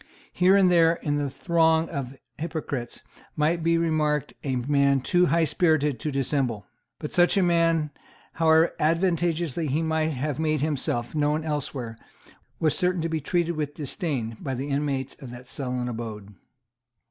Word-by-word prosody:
Here 185 +2 +4
and 185 -2 +4
there 165 -1 +5
in 145 -3 -2
the 145 -1 -1
throng 160 +3 +2
of 135 -3 -5 0.2
hypocrites 150 -6 -4 0.3
might 160 +3 +1
be 165 +1 +2
remarked 155 -3 0
a 135 -2 -1
man 140 +2 +2
too 180 +6 +3
highspirited 155 -3 +2
to 155 - -2
dissemble. 135 -6 -1 0.3
But 150 - -6
such 175 +3 +4
a 195 - +4
man, 165 -3 +2 0.4
however 160 0 +4
advantageously 165 -1 0
he 150 +4 0
might 160 0 0
have 140 +1 -3
made 155 -2 0
himself 130 -5 -1
known 150 +1 +1
elsewhere, 135 -6 -3 0.6
was 155 -3 +2
certain 180 -1 +1
to 165 - -1
be 160 -1 -1
treated 170 +3 -1
with 150 -1 -3
disdain 140 - -3
by 135 -2 -4
the 135 +4 -4
inmates 140 -2 -1
of 135 - -8
that 125 +1 -10
sullen 125 -2 -2
abode. 110 -4 -6
150 Hz, 155 wpm, -25 LUFS, 135-165 Hz, 0.6 s, there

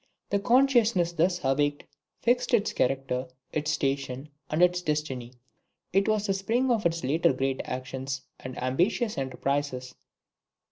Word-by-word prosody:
The 200 - +2
consciousness 235 -6 +4
thus 175 +2 +1
awakened 145 +2 +1 0.4
fixed 245 +1 +3
its 215 -1 0
character, 130 -1 0 0.3
its 155 0 -1
station, 135 -1 -1 0.2
and 155 +3 +2
its 180 0 +3
destiny; 150 -7 -2 0.6
it 195 +2 +3
was 215 -1 +1
the 195 - +1
spring 230 +7 +1
of 220 -6 +3
its 165 0 -3
later 140 +2 +3
great 135 0 -1
actions 130 +1 -4 0.2
and 130 0 -7
ambitious 180 - +1
enterprises." 135 -1 -2
150 Hz, 135 wpm, -28 LUFS, 135-195 Hz, 0.6 s, consciousness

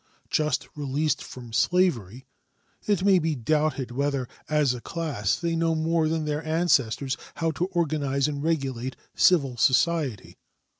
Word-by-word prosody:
Just 150 -3 0
released 145 +1 -1
from 120 -3 -10
slavery, 130 - +1 0.6
it 200 -3 +1
may 195 -2 +6
be 160 -2 -1
doubted 150 0 0
whether 140 0 -1 0.2
as 150 -4 +2
a 125 - -7
class 145 - -1
they 170 -1 -2
know 165 0 +1
more 160 0 +1
than 160 0 -1
their 150 +1 -2
ancestors 140 -5 +1 0.2
how 165 -1 0
to 175 +3 -2
organize 150 -6 0
and 145 -1 -3
regulate 135 -5 -2 0.2
civil 140 -9 +3
society. 135 - +1
150 Hz, 140 wpm, -26 LUFS, 130-165 Hz, 0.6 s, may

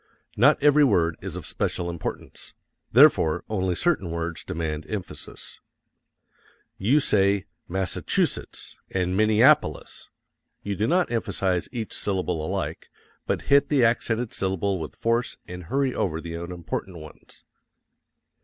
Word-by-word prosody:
Not 140 +8 +5
every 150 0 +6
word 85 - +3
is - - -5
of - - -6
special 90 - -2
importance 85 -2 -6 0.4
therefore 80 -1 +5
only 95 -4 0
certain 125 - +1
words 85 0 -4
demand 80 -4 -4
emphasis. 100 -4 -7 1.2
You 120 +10 +3
say 100 - +2 0.2
Massa_CHU_setts 95 0 -1
and 90 -1 -1
Minne_AP_olis, 110 +2 +3 0.5
you 100 -1 -3
do 105 +3 0
not 180 -1 +2
emphasize 95 -5 -1
each 115 -3 -5
syllable 90 -5 -2
alike, 80 - -4 0.4
but - - -1
hit 140 0 +4
the 135 -5 +4
accented 115 0 0
syllable 95 0 -1
with 80 - -7
force 115 +1 0
and 90 -1 -8
hurry 135 +6 0
over 80 -4 -1
the 85 0 -7
unimportant 85 +2 -5
ones. 80 -1 -14
95 Hz, 125 wpm, -25 LUFS, 85-115 Hz, 1.2 s, every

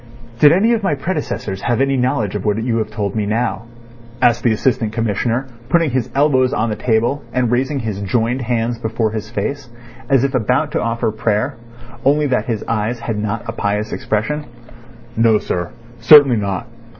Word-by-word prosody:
"Did 145 +2 +7
any 210 +8 +3
of 225 - 0
my 170 -7 0
predecessors 140 - -4
have 120 0 0
any 135 0 +2
knowledge 125 -5 0
of 105 -2 -3
what 105 +1 0
you 115 -1 0
have 110 -1 -2
told 105 -2 -3
me 105 -2 -1
now?" 115 +2 -1 0.5
asked 120 -2 +3
the 120 - +3
Assistant 110 -1 0
Commissioner, 115 +3 -1 0.2
putting 165 -3 +2
his 125 -1 -1
elbows 135 -3 +3
on 110 +1 0
the - - -1
table 120 +5 0
and 125 -2 0
raising 135 +4 0
his 105 -3 -4
joined 115 +6 0
hands 120 -1 -1
before 110 -1 -1
his 110 -1 -5
face, 125 +5 -4 0.4
as 135 -2 +4
if 140 - 0
about 125 0 +1
to - - -1
offer 115 -1 -1
prayer, 110 +4 -1 0.5
only 145 +2 +3
that 125 -6 0
his 115 -4 -2
eyes 115 +1 -2
had 115 -3 -3
not 105 -1 -3
a - - -2
pious 105 -1 -2
expression. 150 +8 -2 0.7
"No, 115 -1 +4
sir; 90 -4 -3 0.3
certainly 135 0 +7
not. 100 0 -2
115 Hz, 185 wpm, -18 LUFS, 110-130 Hz, 0.7 s, Did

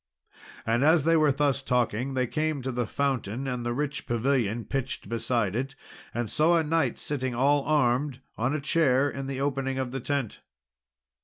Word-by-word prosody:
And 115 +3 +2
as 160 0 +5
they 165 +2 +4
were 155 -2 +4
thus 140 0 +1
talking, 125 0 0
they 130 -1 +2
came 155 +1 -1
to 130 - -2
the 120 -2 -2
fountain 130 -3 -1
and 125 -2 -2
the 120 - -1
rich 140 +2 -3
pavilion 120 -2 0
pitched 135 -1 -3
beside 115 -3 -1
it, 135 +2 -3 0.4
and 120 -1 -2
saw 160 +8 +3
a 165 - +2
knight 155 -5 +1
sitting 130 -4 -3
all 140 +3 +3
armed 135 -2 +1 0.2
on 125 +6 0
a - - -1
chair 140 -3 +3
in 135 0 -5
the 135 -1 -4
opening 135 -1 -1
of 130 -2 -2
the 135 - -3
tent. 135 -3 -3
135 Hz, 180 wpm, -27 LUFS, 120-145 Hz, 0.4 s, as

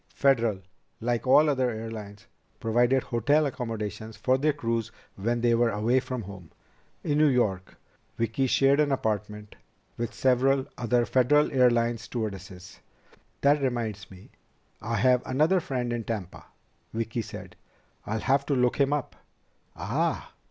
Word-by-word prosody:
Federal, 115 -7 +2 0.4
like 120 +2 -2
all 150 +4 +6
other 130 -4 +1
airlines, 110 -2 -7 0.3
provided 120 +3 +2
hotel 145 +6 +2
accommodations 110 -5 -5
for 130 +4 +2
their 150 +3 +2
crews 115 -5 -2 0.2
when 115 +4 -1
they 120 0 +3
were 115 0 +3
away 115 +5 +1
from 125 -2 -5
home. 95 -4 -11 0.5
In 145 0 0
New 155 - +5
York, 105 -9 0 0.4
Vicki 115 +4 0
shared 135 +2 +3
an 150 -2 +2
apartment 105 -4 -3 0.4
with 120 0 -4
several 130 +1 +2
other 120 0 +1
Federal 135 +5 +3
Airlines 120 -3 +2
stewardesses. 95 -6 -6 0.6
"That 145 +1 +4
reminds 115 -7 -2
me. 95 0 -15 0.5
I 115 +2 -2
have 125 0 +3
another 155 +8 +2
friend 125 -6 -3
in 120 -1 -3
Tampa," 105 -5 -6 0.5
Vicki 115 +1 -2
said. - - -9 0.5
"I'll 110 +1 -2
have 140 +2 +2
to 140 - +1
look 125 -1 +2
him 140 +1 +3
up." 145 -2 -3 0.6
"Ah!" - - -2
120 Hz, 140 wpm, -27 LUFS, 110-130 Hz, 0.6 s, all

